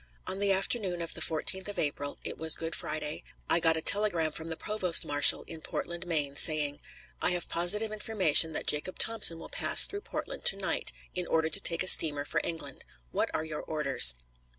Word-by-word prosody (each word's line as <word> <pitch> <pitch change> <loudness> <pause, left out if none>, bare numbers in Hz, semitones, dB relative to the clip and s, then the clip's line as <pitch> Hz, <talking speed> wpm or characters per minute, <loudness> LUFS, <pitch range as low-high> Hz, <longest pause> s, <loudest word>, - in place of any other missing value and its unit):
On 190 - -5
the 200 0 0
afternoon 195 -1 -2
of 165 -1 -5
the 165 - -5
14th 170 +5 -1
of 205 - -7
April 145 -1 -4
it - - -6
was 160 -1 +2
Good 165 0 -7
Friday 150 -1 -5 0.2
I - - +2
got 160 -1 +1
a 160 - -5
telegram 175 -7 +4
from 160 +2 -8
the 165 - -6
provost 190 -5 +1
marshal 145 0 +5
in 160 - -12
Portland, 175 +3 -7
Me., 150 -5 -2
saying: 150 -1 +1 0.4
"I - - +1
have 175 -1 -2
positive 210 +6 0
information 190 -7 +3
that - - -5
Jacob 150 +5 0
Thompson 215 -7 +4
will - - -12
pass - - +4
through 405 - -8
Portland - - -8
to 485 - +5
night, - - -2 0.2
in 180 -1 -5
order 160 0 -1
to 195 - -5
take 170 -2 0
a - - -6
steamer 145 -5 +5
for - - -3
England. 145 -5 -7 0.3
What - - -2
are 155 - -4
your 155 -1 -7
orders?" 140 - +4
165 Hz, 200 wpm, -28 LUFS, 155-190 Hz, 0.4 s, marshal